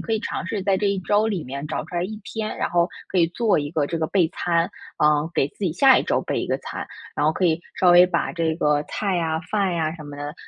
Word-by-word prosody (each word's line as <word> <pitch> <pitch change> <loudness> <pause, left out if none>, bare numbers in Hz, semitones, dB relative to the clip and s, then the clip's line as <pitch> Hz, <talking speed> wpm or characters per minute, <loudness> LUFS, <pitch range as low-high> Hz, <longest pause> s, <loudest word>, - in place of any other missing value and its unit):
可 225 - -4
以 220 - +1
尝 215 - -4
试 200 0 -3
在 195 -1 +2
这 205 +1 0
1 200 - +1
周 205 +3 +2
里 195 -7 -2
面 140 +3 -6
找 155 - -3
出 175 - -7
来 175 - 0
1 215 +3 -5
天， 215 +1 -4
然 - - -2
后 175 0 +2 0.2
可 185 - 0
以 170 - +5
做 210 +4 +1
一 145 -1 -2
个 155 -3 +1
这 165 - -2
个 160 - 0
备 180 -3 +2
餐， 170 0 0 0.3
嗯， 150 +1 +3
给 135 - +2
自 - - -28
己 175 - 0
下 265 - +6
一 - - -2
周 - - +1
备 - - -2
一 - - -3
个 - - 0
餐。 - - -6 0.3
然 145 - +2
后 155 - +3
可 185 - -1
以 165 0 +1
稍 180 - +4
微 175 +1 +8
把 170 -2 -1
这 165 -2 -1
个 150 -2 +2
菜 195 0 -1
啊， 160 -1 -1
饭 195 -4 +1
呀 160 -1 0
什 155 - -10
么 145 -1 -9
的， 145 +1 -5
170 Hz, 290 characters per minute, -23 LUFS, 155-195 Hz, 0.3 s, 微